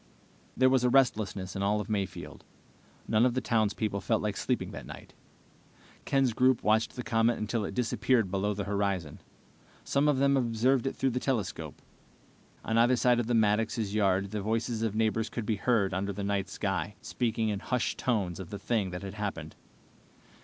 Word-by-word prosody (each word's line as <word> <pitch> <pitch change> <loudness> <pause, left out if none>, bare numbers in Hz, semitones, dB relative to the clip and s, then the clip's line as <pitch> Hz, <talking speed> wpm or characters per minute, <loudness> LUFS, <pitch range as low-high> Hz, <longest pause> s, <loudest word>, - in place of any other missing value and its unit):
There 130 - +5
was 130 -1 +3
a 125 - +4
restlessness 105 -8 +1
in 95 - -3
all 105 +2 +1
of 105 - -4
Mayfield. 100 -4 -4 0.6
None 110 +1 +3
of 125 -1 +2
the - - +2
townspeople 110 -4 0
felt 110 -2 0
like 105 -1 -1
sleeping - - -2
that - - -8
night. - - -11 0.9
Ken's 135 -3 +2
group 130 +1 +3
watched 110 +1 +2
the 125 - -5
comet 115 -1 +2
until 110 +1 -2
it - - -6
disappeared 115 -3 +1
below 100 +1 0
the 100 - -3
horizon. 100 -6 -2 0.6
Some 140 +2 +1
of 145 -2 +3
them 140 +1 +3
observed 125 +1 +1
it - - -3
through 135 - 0
the 125 - -1
telescope. 125 -7 -3 0.8
On 115 +1 +1
either 120 +2 +5
side 125 0 +3
of 120 - -1
the 120 - +1
Maddoxes' 110 0 +1
yard 100 -2 +1
the 105 -1 -3
voices 110 +2 -1
of 110 -2 -1
neighbors 110 0 +1
could 115 -1 -4
be 110 0 0
heard 100 -3 +1
under 100 +2 -1
the 100 +1 -5
night 100 -1 -1
sky, 100 0 -2
speaking 115 -2 -1
in 100 -2 -2
hushed 125 +3 -2
tones 100 -9 -1
of 95 - -7
the 100 - -5
thing 100 -1 -1
that 90 +2 -6
had 100 0 -6
happened. 100 -7 -5
110 Hz, 190 wpm, -29 LUFS, 100-120 Hz, 0.9 s, There